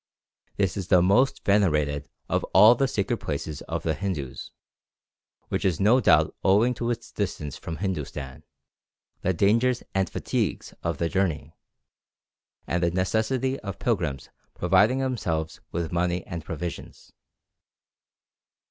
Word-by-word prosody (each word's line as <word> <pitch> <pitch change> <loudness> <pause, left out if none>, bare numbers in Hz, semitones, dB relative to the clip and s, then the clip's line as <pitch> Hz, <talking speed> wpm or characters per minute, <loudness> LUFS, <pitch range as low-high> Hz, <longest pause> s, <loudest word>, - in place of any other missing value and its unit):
This 95 -2 0
is 95 -3 -4
the 90 - +5
most 125 +9 +2
venerated 75 -8 +2 0.2
of - - 0
all 110 +3 +9
the 135 +3 +1
sacred 110 -1 -1
places 75 -2 -4
of - - -3
the 80 - +1
Hindus, 80 -8 -4 1.0
which - - -1
is 90 -5 +1
no 110 +6 +5
doubt - - +4
owing 105 +6 +4
to 120 0 -3
its 120 -1 -4
distance 80 -8 -3
from 80 - -6
Hindustan, 75 -8 -4 0.8
the 95 - +1
dangers 115 +7 +2
and 95 -3 +1
fatigues - - -2
of 85 -3 -2
the 85 - 0
journey, 80 -5 -1 1.1
and 85 - -1
the 85 - +3
necessity 110 +9 0
of 100 -3 -6
pilgrims 80 - -2 0.2
providing 120 +6 +3
themselves 90 -12 -2
with 85 -1 -3
money 90 0 0
and 85 -4 -6
provisions. 85 +1 -7
95 Hz, 130 wpm, -26 LUFS, 80-110 Hz, 1.1 s, all